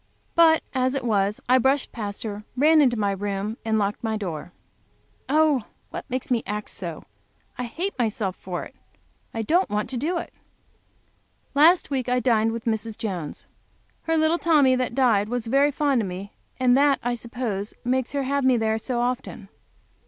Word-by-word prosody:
But 325 -1 +5
as 260 0 +1
it 270 - -2
was 205 -3 +1
I 255 +1 +5
brushed 265 +2 +1
past, 205 -2 -5 0.3
ran 310 +3 +5
into 250 -4 +3
my 205 -2 +1
room, 200 +2 -3
and 220 -1 +1
locked 205 +1 -1
my 220 -1 -1
door. 175 -5 -5 0.8
Oh, 300 -5 +3 0.3
what - - -7
makes 255 +1 -3
me 235 -2 +2
act 210 +1 -4
so! 170 -5 -5 0.5
I 250 - -4
hate 350 +12 -3
myself 215 -5 -1
for 180 -2 -5
it, - - -11 0.6
I 225 - -3
don't 350 - +2
want 210 +3 -2
to 255 - -2
do 325 +8 -1
it! - - -6 1.2
Last 315 +3 +5
week 260 -3 -1
I 250 0 +2
dined 225 -3 +2
with 230 0 -5
Mrs. 220 -1 -2
Jones. 185 -10 -5 0.6
Her 325 0 0
little 315 +2 +2
Tommy 290 -6 +4
was 245 -2 +1
very 275 +5 +3
fond 280 -3 +1
of 205 - -2
me, 185 +2 -7 0.3
and 250 -1 +4
that, 280 -1 +4
I 245 +1 0
suppose, 230 -4 -4
makes 255 +1 0
her 280 -1 0
have 280 +1 0
me 260 -1 +4
there 220 0 0
so 240 +1 -2
often. 245 -5 -3
245 Hz, 175 wpm, -24 LUFS, 210-275 Hz, 1.2 s, But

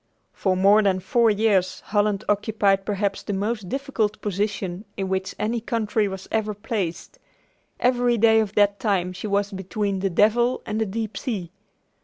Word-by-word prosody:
For 185 -2 0
more 200 +3 +5
than 195 -3 +2
four 230 +5 +2
years 200 -4 +1
Holland 205 -1 0
occupied 205 -2 +1
perhaps 200 -1 -1
the 205 - -4
most 205 0 -2
difficult 270 -6 -1
position 200 -2 -2
in 195 -1 -2
which 190 0 -2
any 225 +2 -1
country 220 -2 0
was 190 -1 -7
ever 215 -1 -1
placed. 205 -5 -4 0.6
Every 245 -1 +2
day 225 0 +5
of 215 -2 -2
that 205 -1 +3
time 185 -4 0
she 185 +4 -6
was 200 0 0
between 195 +1 -2
the 195 +1 0
"devil 230 +7 +2
and 215 +1 -2
the 220 - 0
deep 215 0 -4
sea." 190 -9 -4
205 Hz, 165 wpm, -24 LUFS, 195-220 Hz, 0.6 s, more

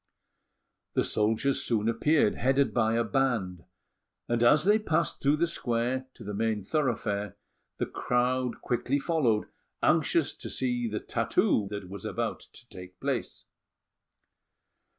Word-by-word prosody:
The - - +3
soldiers 110 +6 +2
soon 110 -2 0
appeared, 115 +2 +3
headed 135 -2 +1
by 110 -1 +2
a 115 - +2
band; 115 -11 -1 0.6
and 120 0 0
as 120 +6 +5
they 210 +2 +5
passed 170 -5 0
through 140 +2 +3
the 170 - +2
square 130 -4 -1
to - - -11
the 105 - -5
main 110 -1 -1
thoroughfare, 105 - -1 0.4
the - - -1
crowd 125 0 -1
quickly 125 +3 0
followed, 135 -8 +1 0.4
anxious - - +2
to - - -8
see 125 -2 -1
the 105 -1 -3
tattoo 105 - +1
that 100 -2 -6
was 100 +1 -8
about - - -3
to 120 - -14
take 90 -1 -11
place. - - -3
120 Hz, 135 wpm, -28 LUFS, 105-135 Hz, 0.6 s, as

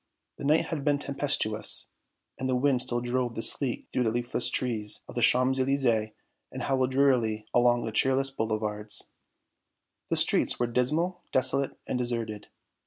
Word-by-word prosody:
The - - -6
night 150 +3 +3
had 150 -4 -4
been 145 0 +2
tempestuous, 135 -7 -1 0.5
and 130 0 -2
the 130 - +1
wind 130 0 +2
still 120 -1 +1
drove 120 0 -2
the 115 - -2
sleet 130 -4 +4
through - - 0
the 115 - +1
leafless 120 +1 -2
trees 115 -5 0
of - - -10
the - - -3
Champs 130 +1 +3
Elysées 125 -5 0 0.4
and - - -6
howled 130 -1 0
drearily 125 -6 +1
along 120 -1 +3
the 110 - -4
cheerless 135 +4 +2
boulevards. 110 -3 -3 1.0
The - - 0
streets - - +2
were 120 - +1
dismal, 155 +10 -1
desolate 130 +2 +2
and 125 - -3
deserted. 115 -4 -3
125 Hz, 160 wpm, -27 LUFS, 115-135 Hz, 1.0 s, sleet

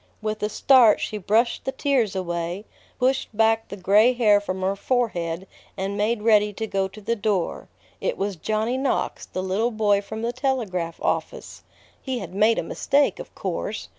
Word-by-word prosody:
With 215 0 -3
a 210 - 0
start 240 -1 +5
she 215 - -3
brushed 225 +5 +1
the 265 - -2
tears 255 -9 0
away, 175 +1 -3 0.3
pushed 255 -4 0
back 225 0 +3
the 200 - -8
gray 210 +6 +4
hair 210 -4 +4
from 190 -2 -4
her 195 +1 +1
forehead, 190 -7 -1 0.3
and 195 +1 -2
made 210 +1 0
ready 210 -2 +4
to 220 +3 -4
go 195 -2 -1
to 195 +3 -13
the 230 +3 -1
door. 205 -5 -1 0.3
It - - -2
was 200 0 -2
Johnny 220 +8 -1
Knox, 270 -1 -1
the 185 - -4
little 195 +5 0
boy 210 -3 +2
from 220 +2 -7
the 235 +1 -1
telegraph 220 - -2
office. - - -3 0.4
He 260 -2 -3
had 185 -6 -7
made 215 +3 +3
a - - 0
mistake, 285 0 +1
of - - -10
course. - - -4
215 Hz, 180 wpm, -24 LUFS, 195-235 Hz, 0.4 s, start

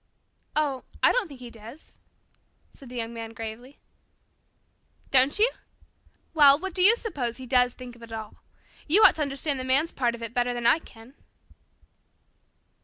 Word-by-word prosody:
"Oh, 285 -4 -1 0.2
I - - +6
don't - - -1
think 275 -5 -13
he 240 -1 -10
does," 230 +7 -14 0.7
said 270 - -13
the 250 - -10
Young 230 -1 -4
Man 225 -1 -8
gravely. 225 +5 -9 1.3
"Don't 265 +4 +4
you? 450 +4 +3 0.8
Well, 285 -3 +6
what 380 +3 -6
do 365 - -1
you 415 +5 +8
suppose 260 - -4
he 260 - -9
does 250 0 +2
think 250 -1 -11
of 240 - -19
it 230 -1 -13
all? 220 -2 -8 0.5
You 385 +8 +4
ought - - +8
to - - -3
understand 280 0 -1
the - - -3
man's 275 +6 +1
part 240 -3 -1
of 235 - -10
it 230 0 -6
better 245 -1 -1
than 240 -1 -5
I 240 +7 +4
can." 230 -4 -17
255 Hz, 175 wpm, -25 LUFS, 235-295 Hz, 1.3 s, you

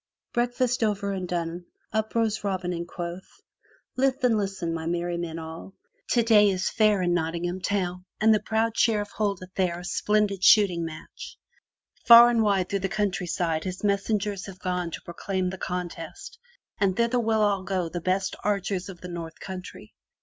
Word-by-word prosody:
^^ - - -54
Breakfast 245 0 0
over 200 -2 0
and 185 -2 -3
done, 175 0 -3 0.3
up 220 +1 -1
rose 220 -2 +1
Robin 185 -3 -2
Hood 175 - -3
and 170 - -5
quoth: 175 +1 -7 0.6
"Lith 265 +1 +1
and 245 -3 +4
listen, 195 -5 -2
my 160 0 -4
merry 175 0 -1
men 170 -1 -4
all. 165 +4 -8 0.3
Today 225 -3 +5
is 185 -1 -1
the - - -1
fair 210 -3 +3
in 175 -1 +1
Not 165 -2 0
tingham 175 +2 -3
town 180 -2 -2
and 220 +1 +5
the 215 - +3
proud 220 +2 0
Sheriff 210 -3 +1
holdeth 195 -4 -3
there 180 -3 0
a 180 - -9
splendid 210 -1 0
shooting 190 -6 +5
match. 160 -1 -9 0.7
Far 235 0 +10
and 230 -1 +2
wide 195 -4 +2
through 200 - 0
the 195 0 -2
countryside 180 -5 -1
his 185 +1 -5
messengers 200 0 0
have 190 -2 -9
gone 180 -2 -2
to - - -7
proclaim 185 +1 -3
the 190 - -8
contest 180 - -6 0.4
and 195 -2 +1
thither 235 +1 +2
will 215 -4 +2
go 190 0 -1
all 170 - -4
the 175 - -4
best 185 +2 0
archers 195 -2 -1
of 180 -3 -10
the 180 - -7
North 170 -2 -7
Country. 185 -1 -9
195 Hz, 185 wpm, -26 LUFS, 175-215 Hz, 0.7 s, Far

